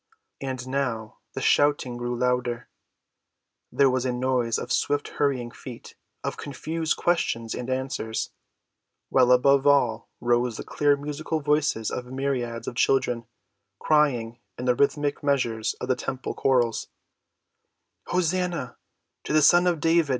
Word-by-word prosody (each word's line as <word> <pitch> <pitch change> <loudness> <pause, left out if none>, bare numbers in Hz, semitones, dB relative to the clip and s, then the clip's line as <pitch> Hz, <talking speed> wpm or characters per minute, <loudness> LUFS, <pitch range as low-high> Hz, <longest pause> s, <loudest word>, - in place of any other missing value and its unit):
And 130 -2 -4
now 120 -5 -3
the - - -4
shouting 145 -4 +2
grew 120 0 -3
louder, 125 -1 0 1.0
there 140 - +4
was 130 -1 0
a 130 - 0
noise 125 -2 0
of - - -5
swift‐hurrying 140 -4 0
feet, 125 -3 -10 0.3
of - - -3
confused 160 +3 -3
questions 115 -10 0
and 125 - -5
answers, 130 -4 -2 0.8
while 125 -1 +4
above 140 +2 +5
all 120 -6 +3
rose 120 -1 +1
the - - -5
clear 145 -1 +2
musical 150 +2 -3
voices 150 -6 +1
of 125 - -4
myriads 125 -3 -3
of - - -3
children 125 -2 +1 0.5
crying 125 -7 +1 0.2
in 125 - -5
the 125 - +4
rhythmic 145 +2 +1
measures 125 -6 0
of - - -6
the 130 - +2
temple 130 0 -4
chorals: 120 -4 +1 1.2
"Hosanna 180 -6 -1 0.5
to - - -3
the 155 -1 +5
Son 175 +4 +6
of 175 -3 +1
David! 165 -1 +3
130 Hz, 135 wpm, -25 LUFS, 120-145 Hz, 1.2 s, Son